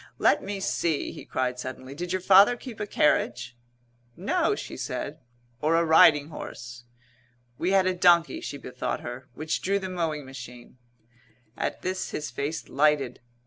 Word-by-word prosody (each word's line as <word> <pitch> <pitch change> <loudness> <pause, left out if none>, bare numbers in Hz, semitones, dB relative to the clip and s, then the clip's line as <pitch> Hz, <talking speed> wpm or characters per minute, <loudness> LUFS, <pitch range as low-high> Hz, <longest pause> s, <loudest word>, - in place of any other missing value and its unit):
"Let - - +3
me 200 0 -4
see," 170 -5 -1
he - - -10
cried 125 -1 -2
suddenly, 130 +1 -7
"did 175 +4 -5
your 185 -1 -1
father 200 +5 +7
keep 240 -3 -9
a 210 - -3
carriage?" 120 -7 +1 0.6
"No," - - +1
she - - -7
said. - - -5 0.4
"Or 155 +2 +2
a 170 0 +3
riding 155 -2 +6
horse!" 120 -5 -9 0.7
"We 175 - 0
had 190 -1 +4
a 185 - +2
donkey," 175 -2 +4
she 140 - -5
bethought 125 -2 -4
her, 120 +2 -8
"which 155 +3 -2
drew 200 +2 +1
the 190 -1 -4
mowing 160 -5 -2
machine." 125 -1 -11 0.8
At - - -3
this 185 +1 -2
his 150 - -4
face 145 +4 -4
lighted. 145 -2 +1
155 Hz, 160 wpm, -26 LUFS, 130-185 Hz, 0.8 s, father